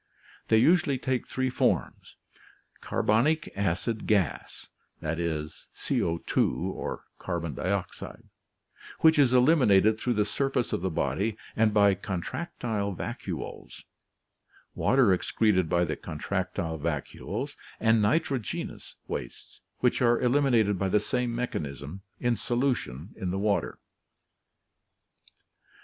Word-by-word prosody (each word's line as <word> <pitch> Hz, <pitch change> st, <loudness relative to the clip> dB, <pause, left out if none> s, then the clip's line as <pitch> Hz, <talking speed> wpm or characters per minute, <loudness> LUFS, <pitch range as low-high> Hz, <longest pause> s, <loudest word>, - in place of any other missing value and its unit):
They 110 Hz, -, +5 dB
usually 145 Hz, +2 st, +4 dB
take 130 Hz, -1 st, -2 dB
three 130 Hz, 0 st, -1 dB
forms: -, -, -1 dB, 0.6 s
carbonic 135 Hz, +10 st, +1 dB
acid 100 Hz, +4 st, -1 dB
gas 100 Hz, -8 st, 0 dB, 0.3 s
(CO2), 80 Hz, +1 st, -2 dB, 2.0 s
which 160 Hz, -1 st, +6 dB
is 135 Hz, -4 st, +5 dB
eliminated 125 Hz, -6 st, +5 dB
through 125 Hz, -, 0 dB
the 105 Hz, -2 st, +2 dB
surface 130 Hz, +3 st, -1 dB
of -, -, -1 dB
the 95 Hz, -, 0 dB
body 90 Hz, -, -1 dB, 0.2 s
and 110 Hz, -1 st, +3 dB
by 100 Hz, -1 st, +5 dB
contractile 100 Hz, -, -3 dB
vacuoles; -, -, -6 dB, 0.9 s
water 125 Hz, -7 st, +4 dB
excreted 95 Hz, -2 st, +1 dB
by 85 Hz, 0 st, +3 dB
the 80 Hz, -, -2 dB
contractile 85 Hz, 0 st, -3 dB
vacuoles; 75 Hz, -2 st, -4 dB, 0.2 s
and 110 Hz, -1 st, +4 dB
nitrogenous 130 Hz, -, -1 dB
wastes, -, -, -7 dB, 0.2 s
which 125 Hz, 0 st, +2 dB
are 120 Hz, -1 st, +4 dB
elim 140 Hz, +4 st, +3 dB
inated 110 Hz, -7 st, +3 dB
by 95 Hz, 0 st, 0 dB
the 105 Hz, -, +4 dB
same 125 Hz, -1 st, -1 dB
mechanism, 75 Hz, -, -4 dB, 0.2 s
in 120 Hz, -1 st, +1 dB
solution 120 Hz, -, -2 dB
in 95 Hz, -4 st, -3 dB
the 95 Hz, -, -1 dB
water. 100 Hz, 0 st, 0 dB
110 Hz, 100 wpm, -28 LUFS, 90-125 Hz, 2.0 s, which